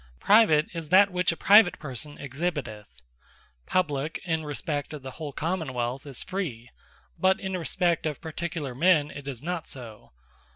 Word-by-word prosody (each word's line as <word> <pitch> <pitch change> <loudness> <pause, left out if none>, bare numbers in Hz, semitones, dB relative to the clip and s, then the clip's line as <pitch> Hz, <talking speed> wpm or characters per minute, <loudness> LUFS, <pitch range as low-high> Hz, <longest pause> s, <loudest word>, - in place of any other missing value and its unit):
Private, 200 -8 +5
is 165 -3 -5
that 195 +3 +6
which 180 0 +1
a 170 - -6
Private 205 -2 +6
person 145 +1 -7
exhibiteth. 130 - -4 0.7
Publique, 155 -4 0
in 160 -2 -1
respect 150 0 -3
of 145 -3 -7
the 130 - -6
whole 150 +1 -6
Common 160 -2 -3
wealth, 125 +4 -3
is 135 -3 -5
Free; 135 -12 -5 0.5
but 190 +2 +3
in 190 -1 -3
respect 175 -1 0
of 150 -3 -4
Particular 160 -4 -4
men 155 +1 +3
it 140 -1 -9
is 130 -2 -5
not 175 -1 -3
so. 115 -5 -10
155 Hz, 160 wpm, -27 LUFS, 135-180 Hz, 0.7 s, that